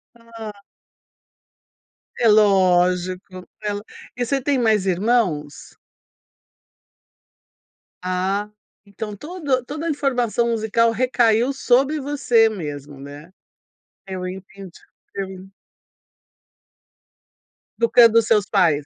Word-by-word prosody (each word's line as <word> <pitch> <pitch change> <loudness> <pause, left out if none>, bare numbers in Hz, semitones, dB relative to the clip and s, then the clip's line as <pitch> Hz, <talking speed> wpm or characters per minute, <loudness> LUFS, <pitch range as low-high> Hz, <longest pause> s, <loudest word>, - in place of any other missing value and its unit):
Ah. 225 -3 -10 1.6
É 235 - +2
lógico, 185 -2 +2
ela 205 -1 -3 0.3
e 245 - -1
você 275 +2 -1
tem 280 0 0
mais 220 -5 +2
irmãos? 185 - -1 2.2
Ah, 190 +3 -2 0.4
então 205 +1 -7
todo 290 - -2
toda 305 +4 -6
a - - -1
informação 245 -5 0
musical 230 +1 +1
recaiu 240 +1 +2
sobre 270 +3 +1
você 265 -5 +2
mesmo, 145 -8 -6
né. 145 +5 -11 0.7
Eu 185 -1 -5
entendi, 190 0 -10 0.4
eu 195 -1 -2
en 190 0 -11 2.3
Educando 230 -1 +5
os 225 - -1
seus 210 -3 +2
pais. 160 -8 +2
210 Hz, 90 wpm, -21 LUFS, 185-240 Hz, 2.3 s, Educando